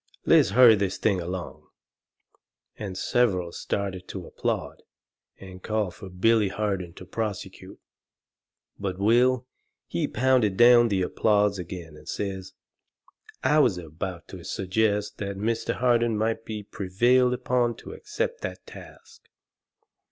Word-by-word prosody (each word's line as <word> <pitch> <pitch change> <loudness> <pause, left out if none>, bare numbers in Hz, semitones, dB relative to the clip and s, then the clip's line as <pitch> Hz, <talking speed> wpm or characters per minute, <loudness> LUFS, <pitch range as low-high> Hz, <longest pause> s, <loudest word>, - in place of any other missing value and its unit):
Let's - - +5
hurry 125 -3 +9
this 100 -3 -1
thing 95 -2 +1
along!" 90 +1 -6 1.1
And 95 -3 -6
several 95 -9 +1
started 95 0 -4
to 95 -3 -7
applaud, - - -3 0.6
and 95 -1 -11
call 105 -3 -1
fur 95 +2 -11
Billy 105 +4 +2
Harden 95 -4 -3
to 90 - -11
prosecute. 105 +1 -5 1.0
But 95 -2 -3
Will, 120 +5 +3 0.4
he - - -2
pounded 120 -6 +2
down 120 0 +7
the 95 -4 0
applause 105 +1 +1
agin, 85 -3 -8
and 75 - -13
says: 95 -2 -4 0.9
"I 150 +4 +4
was 115 -11 +3
about 85 +1 -6
to - - -9
suggest 105 +2 -1
that 100 -1 -4
Mr. 115 +3 -1
Harden 120 -2 +2
might 110 +1 -1
be 110 -1 -5
prevailed 120 +7 +2
upon 120 -2 0
to - - -10
accept 480 - -4
that - - -6
task." 460 -1 -14
105 Hz, 130 wpm, -26 LUFS, 95-115 Hz, 1.1 s, hurry